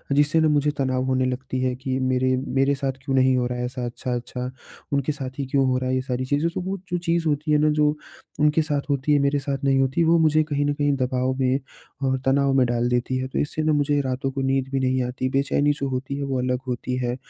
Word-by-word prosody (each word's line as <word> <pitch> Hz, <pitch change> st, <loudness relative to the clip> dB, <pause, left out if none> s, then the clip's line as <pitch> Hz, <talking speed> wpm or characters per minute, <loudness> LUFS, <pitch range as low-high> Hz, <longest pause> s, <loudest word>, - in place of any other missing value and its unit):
जिससे 145 Hz, +2 st, +3 dB
ना 160 Hz, -, +4 dB
मुझे 150 Hz, 0 st, +2 dB
तनाव 130 Hz, -1 st, 0 dB
होने 130 Hz, 0 st, +1 dB
लगती 130 Hz, 0 st, -3 dB
है 130 Hz, -1 st, 0 dB
कि 130 Hz, 0 st, -3 dB
मेरे 130 Hz, 0 st, +1 dB
मेरे 135 Hz, +1 st, +2 dB
साथ 135 Hz, -1 st, -1 dB
क्यों 135 Hz, -1 st, -1 dB
नहीं 130 Hz, 0 st, +4 dB
हो 125 Hz, -, +1 dB
रहा 125 Hz, 0 st, -4 dB
है 125 Hz, -, -1 dB
ऐसा 125 Hz, 0 st, -4 dB
अच्छा-अच्छा, 125 Hz, +1 st, -4 dB, 0.4 s
उनके 140 Hz, +1 st, +1 dB
साथ 135 Hz, -2 st, -7 dB
ही 140 Hz, -, -1 dB
क्यों 135 Hz, +1 st, +1 dB
हो 130 Hz, 0 st, +2 dB
रहा 130 Hz, 0 st, -2 dB
है? 130 Hz, -, +1 dB
ये 130 Hz, -, +1 dB
सारी 130 Hz, 0 st, -3 dB
चीज़ें। 145 Hz, +5 st, +1 dB
तो -, -, -3 dB
वो 190 Hz, +2 st, -3 dB
जो 175 Hz, -, +1 dB
चीज़ 170 Hz, -1 st, 0 dB
होती 150 Hz, +1 st, 0 dB
है 150 Hz, -, +5 dB
ना 155 Hz, -, +4 dB
जो 150 Hz, 0 st, +3 dB, 0.5 s
उनके 150 Hz, +1 st, +4 dB
साथ 145 Hz, -2 st, -1 dB
होती 140 Hz, +1 st, 0 dB
है 145 Hz, -, +4 dB
मेरे 140 Hz, +1 st, +2 dB
साथ 135 Hz, -1 st, -4 dB
नहीं 135 Hz, -1 st, +3 dB
होती, 135 Hz, +5 st, +2 dB
वो 165 Hz, +1 st, +4 dB
मुझे 155 Hz, -1 st, +4 dB
कहीं 145 Hz, -1 st, -1 dB
न 145 Hz, -, +1 dB
कहीं 145 Hz, -1 st, +1 dB
दबाव 130 Hz, 0 st, 0 dB
में 130 Hz, +1 st, +2 dB, 0.4 s
और 130 Hz, 0 st, +1 dB
तनाव 135 Hz, +1 st, +3 dB
में 130 Hz, -2 st, +4 dB
डाल 120 Hz, 0 st, 0 dB
देती 125 Hz, +1 st, 0 dB
है। 130 Hz, 0 st, -2 dB
तो 130 Hz, -, -3 dB
इससे 155 Hz, +1 st, -2 dB
ना 155 Hz, 0 st, +2 dB
मुझे 145 Hz, 0 st, +2 dB
रातों 135 Hz, 0 st, -2 dB
को 135 Hz, -, -3 dB
नींद 135 Hz, 0 st, 0 dB
भी 135 Hz, -, 0 dB
नहीं 130 Hz, 0 st, +1 dB
आती 125 Hz, +1 st, -2 dB
बेचैनी 140 Hz, +2 st, +2 dB
जो 140 Hz, -, 0 dB
होती 130 Hz, +1 st, -3 dB
है, 140 Hz, -, -3 dB
वो 135 Hz, -2 st, -1 dB
अलग 125 Hz, 0 st, 0 dB
होती 125 Hz, 0 st, -3 dB
है 125 Hz, -1 st, -1 dB
135 Hz, 260 wpm, -23 LUFS, 130-145 Hz, 0.5 s, है